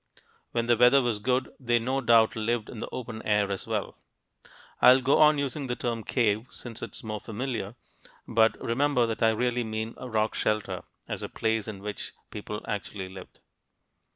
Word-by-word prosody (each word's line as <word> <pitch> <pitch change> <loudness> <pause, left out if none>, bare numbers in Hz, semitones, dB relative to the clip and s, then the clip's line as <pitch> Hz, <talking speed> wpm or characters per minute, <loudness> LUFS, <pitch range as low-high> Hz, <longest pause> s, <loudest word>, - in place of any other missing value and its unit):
When 115 0 0
the 120 0 +4
weather 125 +4 +6
was 120 -5 0
good, 125 +4 0
they 120 -2 +2
no 130 +4 -1
doubt 115 -2 +5
lived 115 0 -1
in 115 - -8
the - - -5
open 115 -3 -6
air 105 -1 +1
as 95 - -4
well. - - -3 0.8
I'll 130 +1 +8
go 135 +2 +3
on 150 -1 +6
using 140 0 -2
the 125 - -1
term 115 -2 -3
"cave" 110 -1 +1
since 115 -3 -7
it's 115 - -7
more 110 -1 -4
familiar, 115 -1 -4 0.5
but 115 0 +3
remember 125 +1 +2
that 115 -1 -3
I 115 - +5
really 120 +2 0
mean 110 0 -4
rock 110 -3 -1
shelter, 105 -1 -1 0.2
as - - -4
a - - -5
place 110 -1 -1
in 100 -3 -7
which 105 -1 -5 0.2
people 105 0 -6
actually 100 -2 -4
lived. 95 -1 -12
115 Hz, 180 wpm, -28 LUFS, 110-125 Hz, 0.8 s, I'll